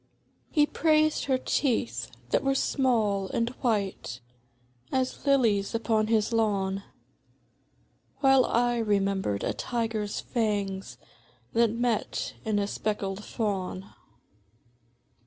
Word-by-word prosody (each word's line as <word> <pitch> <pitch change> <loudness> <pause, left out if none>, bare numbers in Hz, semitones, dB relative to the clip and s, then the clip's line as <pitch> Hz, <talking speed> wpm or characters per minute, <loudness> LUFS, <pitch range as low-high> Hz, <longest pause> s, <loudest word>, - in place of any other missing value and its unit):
He 295 -2 +4
praised 310 0 +2
her 265 -2 +2
teeth, 120 - 0 0.2
that - - +2
were 270 0 +2
small 220 -9 +1
and 230 +4 0
white 200 - -1 0.7
As 260 +2 -1
lilies 230 -7 +3
upon 220 -1 +1
his 220 0 +1
lawn, 200 -3 +1 1.4
While 270 -2 +6
I 240 0 +1
remembered 195 - 0
a - - 0
tiger's 225 -4 -2
fangs 205 -5 -2 0.6
That 230 0 +4
met 230 0 -1
in 215 -1 0
a 200 - +1
speckled 205 -1 -3
fawn. 195 -4 -3
220 Hz, 100 wpm, -28 LUFS, 200-245 Hz, 1.4 s, While